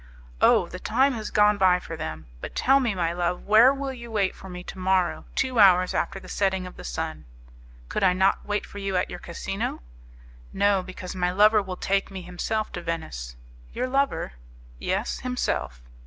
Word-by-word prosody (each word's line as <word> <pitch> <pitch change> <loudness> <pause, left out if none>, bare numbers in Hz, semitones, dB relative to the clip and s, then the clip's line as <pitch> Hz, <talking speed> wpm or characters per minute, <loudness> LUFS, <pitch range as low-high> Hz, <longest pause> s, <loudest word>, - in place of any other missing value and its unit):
"Oh! - - +5
the - - -8
time 265 +5 +2
has 220 -3 -5
gone 210 0 +4
by 185 -1 +5
for 165 - -7
them! 80 - -6 0.2
But - - -7
tell 270 +2 +4
me, 235 -6 0
my 170 -2 0
love, 175 0 -1
where 220 +5 +7
will 275 -1 -3
you 235 -2 -9
wait 205 -4 0
for 190 - -11
me 180 0 -7
to 185 - -9
morrow, 185 -1 +1
two 260 -3 0
hours 185 -2 +6
after 195 - -1
the 185 - -13
setting 190 -1 0
of 180 - -9
the - - -10
sun?" - - -4 0.6
"Could - - -2
I 185 -1 +5
not 190 +1 +2
wait 205 0 -2
for 205 - -9
you 195 -2 -1
at - - -1
your - - -6
casino?" - - -4 0.7
"No, 200 -1 +3
because 185 0 -8
my 180 -1 +1
lover 210 +3 +5
will 185 -2 -6
take 195 +1 0
me 190 -2 -7
himself 195 +5 -3
to 175 - -5
Venice." 70 - -5 0.4
"Your 255 - -1
lover?" 270 - 0 0.5
"Yes, 195 +5 -2
himself." 250 - -2
190 Hz, 195 wpm, -25 LUFS, 180-215 Hz, 0.7 s, where